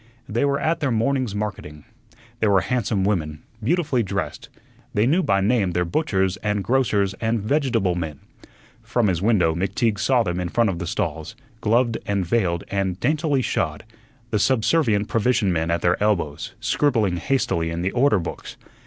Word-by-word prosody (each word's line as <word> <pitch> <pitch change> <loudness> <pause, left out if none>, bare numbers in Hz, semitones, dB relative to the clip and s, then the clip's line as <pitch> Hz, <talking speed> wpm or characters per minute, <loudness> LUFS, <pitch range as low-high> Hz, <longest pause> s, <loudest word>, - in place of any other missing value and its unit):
They 120 +6 0
were 140 0 +1
at 165 +1 0
their 145 - 0
morning's 120 -1 0
marketing. 95 -8 -5 0.5
They 110 - +2
were 100 -2 +4
handsome 105 -2 -1
women, 80 -6 -1 0.2
beautifully 140 -2 +1
dressed. 100 -4 -4 0.5
They 105 +2 +3
knew 160 +9 +3
by 100 - +1
name 100 -3 +1
their 90 0 +1
butchers 95 - 0
and 105 -1 -1
grocers 105 -4 +1
and 115 0 +1
vegetable 115 - +1
men. 80 -5 -4 0.6
From 120 -2 0
his 85 -2 -1
window 95 -6 +3
McTeague 100 +5 0
saw 125 0 +3
them 90 -3 -2
in 90 -1 -2
front 115 +1 +2
of 85 - -5
the 85 - -4
stalls, 80 -1 -3 0.2
gloved 115 +1 +1
and 100 -2 0
veiled 85 -4 0
and 95 -2 -1
daintily 150 -3 +1
shod, 75 -8 -2 0.5
the 105 - +1
subservient 110 -2 +2
provision 115 -4 +1
men 80 0 -1
at 85 0 0
their 85 +2 +1
elbows, 90 -9 -1
scribbling 110 -11 +1
hastily 120 -8 0
in 85 +1 -3
the 95 - 0
order 125 -3 +3
books. 85 - -6
105 Hz, 170 wpm, -23 LUFS, 90-120 Hz, 0.6 s, were